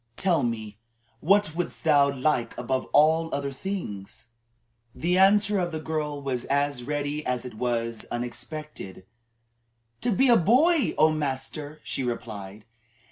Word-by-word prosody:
Tell 175 -5 +2
me 110 -3 -3 0.4
what 195 0 +3
wouldst 175 0 -4
thou 145 -3 +4
like 130 -3 -1
above 130 -1 -1
all 160 +2 +3
other 140 -1 -3
things?" 130 - -6 0.7
The 175 +8 +1
answer 205 +1 +4
of 175 -1 -1
the 160 - -3
girl 155 -2 -3
was 130 -3 -2
as 140 -2 0
ready 145 +3 -3
as 125 -2 -2
it 125 - -7
was 115 -1 -2
unexpected. 120 - -6 1.0
"To 240 - +1
be 260 +6 +3
a 240 -2 +7
boy, 275 - +3
O 155 0 +5
master!" 150 +1 -4
she 135 - -3
replied. 105 -4 -5
145 Hz, 135 wpm, -26 LUFS, 120-165 Hz, 1.0 s, a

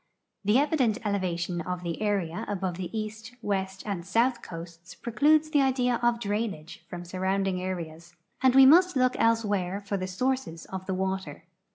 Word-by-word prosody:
The 210 +4 +4
evident 270 -7 +2
elevation 180 -3 -1
of 180 +1 -4
the 170 +2 -4
area 195 -6 -1
above 190 -3 -2
the 180 -2 -4
east, 220 +2 -5
west, 190 -1 -2
and 195 -5 -3
south 235 +6 +1
coasts 170 +1 -10
precludes 305 +6 +2
the 290 -3 +4
idea 250 -3 +2
of 240 -1 +2
drainage 205 -7 -3
from 175 0 -7
surrounding 190 +1 -1
areas, 170 -2 -6 0.3
and 260 -1 +4
we 270 0 +9
must 355 +5 +6
look 255 -1 +3
elsewhere 205 -5 +1
for 200 0 -3
the 185 -1 -3
sources 220 -3 -2
of 190 -1 -7
the 190 - -1
water. 190 -5 -3
200 Hz, 165 wpm, -27 LUFS, 180-235 Hz, 0.3 s, we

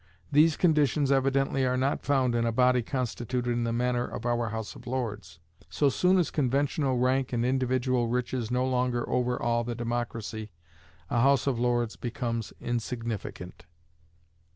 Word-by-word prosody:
These 155 +2 +5
conditions 150 -4 +2
evidently 135 0 +2
are 130 0 +1
not 135 +2 0
found 130 -4 +1
in 120 0 +1
a 115 - +1
body 125 +1 +3
constituted 125 0 -2
in 120 0 0
the 115 - -1
manner 120 +1 0
of 120 - -6
our 120 -1 0
House 110 -1 -5
of - - -13
Lords. 105 -10 -4 0.3
So 145 - +2
soon 180 +7 +3
as 175 - +1
conventional 140 -1 +1
rank 130 +1 +1
and 120 0 +1
individual 130 -1 +1
riches 120 -1 -2
no 125 +1 +1
longer 125 -2 0
overawe 125 -1 0
the 120 0 -4
democracy, 115 -2 -4 0.6
a 120 -3 +2
House 135 0 +4
of 130 -4 0
Lords 120 -2 0
becomes 120 -3 -3
insignificant. 115 -6 -5
125 Hz, 155 wpm, -28 LUFS, 120-130 Hz, 0.6 s, These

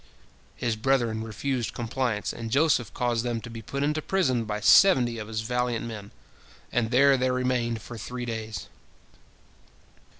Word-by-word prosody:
His 115 -2 -1
brethren 115 -2 +1
refused 120 +2 -3
compliance, 120 -2 -2
and 115 -1 -6
Joseph 135 -5 +2
caused 120 0 -1
them 120 -2 -2
to 115 - -9
be 115 0 -7
put 140 +6 -3
into 150 +1 0
prison 130 -11 +1
by 105 0 -3
seventy 120 - +5
of 105 - -6
his 110 0 -3
valiant 125 0 -1
men, 105 -3 -7 0.6
and 115 -2 0
there 135 +2 +5
they 130 0 +1
remained 125 -3 -1
for 120 -2 -8
three 125 +3 -5
days. 110 -2 -5
120 Hz, 155 wpm, -26 LUFS, 110-130 Hz, 0.6 s, seventy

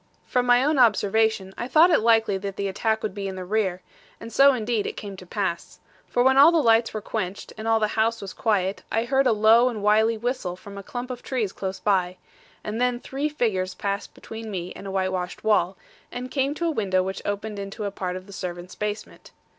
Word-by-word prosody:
From 250 -1 0
my 245 +1 +5
own 295 0 +2
observation, 220 -3 +2
I 240 - -3
thought 315 +7 +5
it 320 - +5
likely 225 -2 +3
that 195 0 -5
the 200 0 -2
attack 220 +3 -1
would 210 - -2
be 200 -1 -4
in 190 - -5
the 185 -1 -6
rear; 190 -2 -1 0.4
and 230 0 -9
so 275 +1 +7
indeed 230 -3 -1
it - - -6
came 200 -2 -7
to 185 - -12
pass. 190 -4 -3 0.3
For 245 - +1
when 265 +1 +4
all 300 +4 +9
the 340 - +2
lights 230 -5 +4
were 215 - -4
quenched, 200 -3 -4
and 220 +1 -6
all 225 0 +3
the 215 -1 +1
house 225 +1 +1
was 195 -2 -7
quiet, 195 -3 0
I 225 - +1
heard 270 +1 +2
a - - +4
low 225 +3 +5
and 215 -4 -5
wily 220 +2 +3
whistle 235 -6 -3
from 200 +2 -12
a 200 - -6
clump 245 +5 -6
of 245 -1 -6
trees 230 -7 -2
close 190 0 -5
by; 185 -3 +1 0.5
and 220 +3 -3
then 250 -1 +1
three 275 +4 -3
figures 195 -10 -1
passed 200 0 -4
between 225 0 -8
me 180 -3 -5
and 200 - -9
a - - -4
whitewashed 185 -1 -2
wall, 195 -4 +2 0.3
and 250 +1 -6
came 275 +1 0
to 340 - -2
a 335 - +2
window 190 -8 +1
which 190 +1 -4
opened 205 +1 -4
into 200 +2 -6
a 200 - -2
part 185 -2 -4
of 185 0 -7
the 200 - -12
servants' 180 -1 -6
basement. 210 0 -5
215 Hz, 230 wpm, -24 LUFS, 195-240 Hz, 0.5 s, all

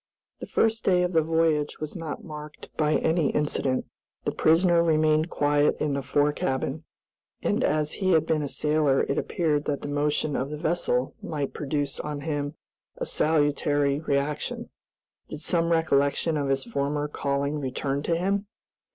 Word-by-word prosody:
The - - -7
first 225 0 +1
day 180 -1 +3
of 180 0 -1
the 160 - +5
voyage 160 -2 +1
was 155 -1 -5
not 165 -4 -5
marked 150 -1 -10
by 155 -1 +2
any 160 -3 +2
incident. 140 -3 0 0.4
The - - +1
prisoner 170 +1 +4
remained 155 0 +3
quiet 145 -1 +2
in 150 -2 0
the 140 - -1
fore 145 +2 +2
cabin, 135 +2 -2 0.6
and - - +1
as 150 0 +1
he 190 -2 +1
had 160 -1 +4
been 155 -1 +1
a 145 - -2
sailor 150 -1 +2
it 140 - 0
appeared 150 -4 0
that 145 -1 -2
the - - -3
motion 145 +1 0
of 135 +2 -1
the 150 - -5
vessel 150 -5 0
might 145 -4 -3
produce 145 -1 -2
on 150 -1 -4
him 145 -1 -3 0.4
a - - -3
salutary 145 -2 +1
reaction. 145 -1 -2 0.6
Did 150 - -7
some 170 -1 +1
recollection 160 0 +2
of 140 -2 -1
his 135 0 +1
former 145 -8 -1
calling 140 0 -1
return 135 +1 -2
to 165 +3 0
him? 200 +3 0
150 Hz, 165 wpm, -26 LUFS, 145-160 Hz, 0.6 s, the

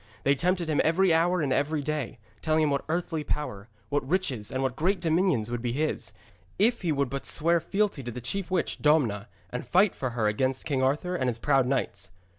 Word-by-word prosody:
They 140 - +4
tempted 175 +3 0
him 155 -2 +2
every 170 +2 +3
hour 175 +2 +2
and 135 -3 +1
every 145 +1 0
day, 150 -5 -3 0.2
telling 155 0 +2
him 150 - +2
what 140 - 0
earthly 165 -1 -1
power, 115 -9 -4 0.2
what 140 -1 -1
riches 140 - 0
and 130 +1 -2
what 130 -2 -1
great 185 +6 +1
dominions 165 - +1
would 120 -1 -2
be 120 -1 -2
his, 155 +3 -2 0.5
if 235 +5 +2
he 175 -4 0
would 140 -2 +1
but 140 0 -4
swear 170 +2 +2
fealty 200 -3 -1
to 120 -1 -6
the 125 - -6
chief 170 - -2
witch, 185 -3 -1
Domna, 120 -9 +2 0.2
and 125 - -4
fight 185 - +3
for 130 - -3
her 110 - +1
against 130 +5 0
King 135 -3 0
Arthur 150 +7 0
and 130 -6 0
his 120 - -2
proud 135 +1 +2
knights. 105 -7 -2
150 Hz, 215 wpm, -27 LUFS, 130-170 Hz, 0.5 s, They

